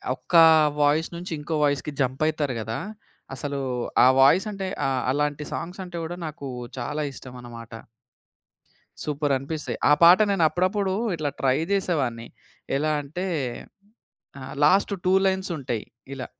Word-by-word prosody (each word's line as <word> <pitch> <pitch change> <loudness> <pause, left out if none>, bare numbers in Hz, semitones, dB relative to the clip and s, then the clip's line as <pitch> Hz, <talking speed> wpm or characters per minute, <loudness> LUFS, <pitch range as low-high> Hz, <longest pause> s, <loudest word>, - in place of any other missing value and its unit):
ఒక్కా 165 +4 +4 0.4
voice 150 +3 +2
నుంచి 175 +1 -7
ఇంకో 155 +2 -3
వాయిస్‌కి 145 +1 0
jump 130 +2 -1
అయితారు 150 -4 -1
గదా! 110 +1 -4 0.6
అసలు 140 0 -4 0.5
ఆ - - +8
వాయిసంటే 195 +7 +3 0.2
ఆ - - +2 0.2
అలాంటి 145 +1 -1
సాంగ్సంటే 180 0 -6
గూడా 165 +2 -5
నాకూ 150 -2 -7 0.3
చాలా 150 +5 -3
ఇష్టమనమాట. 120 -3 -11 1.3
సూపరనిపిస్తాయి. 145 0 -2
ఆ - - +8
పాట 175 +2 +9
నేనప్పుడప్పుడు 185 +2 +1 0.2
ఇట్లా 155 -3 -2
ట్రై 135 0 +2
జేసేవాడిని. 140 -12 -1 0.5
ఎలా 155 +2 0
అంటే 160 +7 -5 1.1
ఆహ్, 130 - -8
లాస్ట్ 195 +6 +4
2 185 - +3
లైన్స్ 190 0 0
ఉంటయి 120 -5 -4 0.3
ఇలా. 130 - -6
150 Hz, 120 wpm, -24 LUFS, 135-175 Hz, 1.3 s, పాట